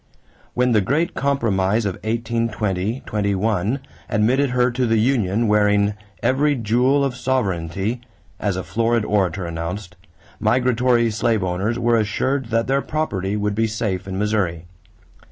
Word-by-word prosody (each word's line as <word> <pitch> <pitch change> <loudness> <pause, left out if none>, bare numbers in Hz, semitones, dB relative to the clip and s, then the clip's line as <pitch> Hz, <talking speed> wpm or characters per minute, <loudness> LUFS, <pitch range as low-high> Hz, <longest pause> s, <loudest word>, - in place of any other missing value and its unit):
When 125 0 +2
the 110 -3 +4
great 155 - 0
compromise 110 -6 +1
of 100 - 0
1820 110 -2 -2
21 105 +3 0 0.3
admitted 125 +6 +2
her 125 0 +2
to 125 0 0
the 115 0 +2
union, 110 -2 +1
wearing 105 -1 +3 0.3
"every 145 +3 +2
jewel 125 +5 +2
of 130 -2 -2
sovereignty," 110 -4 -1 0.4
as 100 -3 -1
a 95 - -3
florid 115 +2 0
orator 95 -3 0
announced, 85 +4 -5 0.4
migratory 120 0 +2
slave 110 -1 +1
owners 95 +6 -1
were 120 -1 +2
assured 125 +5 0
that 115 0 +1
their 135 +1 +1
property 105 -13 -2
would 105 0 -1
be 110 +2 +1
safe 100 -4 -3
in 95 -1 -4
Missouri. 100 -5 -1
110 Hz, 135 wpm, -21 LUFS, 100-125 Hz, 0.4 s, the